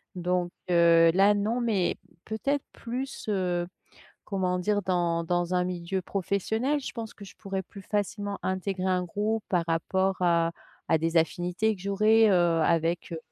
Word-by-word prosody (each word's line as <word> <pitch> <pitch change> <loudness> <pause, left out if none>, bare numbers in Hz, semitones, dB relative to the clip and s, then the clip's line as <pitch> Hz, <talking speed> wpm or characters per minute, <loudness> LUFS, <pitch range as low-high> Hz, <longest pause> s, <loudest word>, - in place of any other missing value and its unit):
Donc, 180 0 -1 0.2
heu, 170 -1 +6
là 195 +3 +5
non, 220 +4 0
mais 210 -7 +1 0.3
peut-être 275 +6 -2
plus, 250 +3 -5
heu, 180 -3 0 0.6
comment 185 -2 -1
dire? 205 +3 +1
Dans 175 -2 0
dans 175 +1 0
un 180 0 +2
milieu 180 +1 -3
professionnel, 220 +10 -1
je 265 - -6
pense 225 -2 -6
que 205 - -11
je - - -14
pourrais 195 -2 -4
plus 195 +2 -12
facilement 205 0 -2
intégrer 190 0 -2
un 185 -1 +1
groupe 210 +4 -2
par 175 -3 +2
rapport 190 +3 0
à 170 -2 +2 0.4
à 160 - +4
des 165 +2 -1
affinités 175 +6 +1
que - - -16
j'aurais, 215 +3 +4
heu, - - +4 0.3
avec, 170 +2 0
heu, 165 - -3
190 Hz, 160 wpm, -27 LUFS, 175-210 Hz, 0.6 s, heu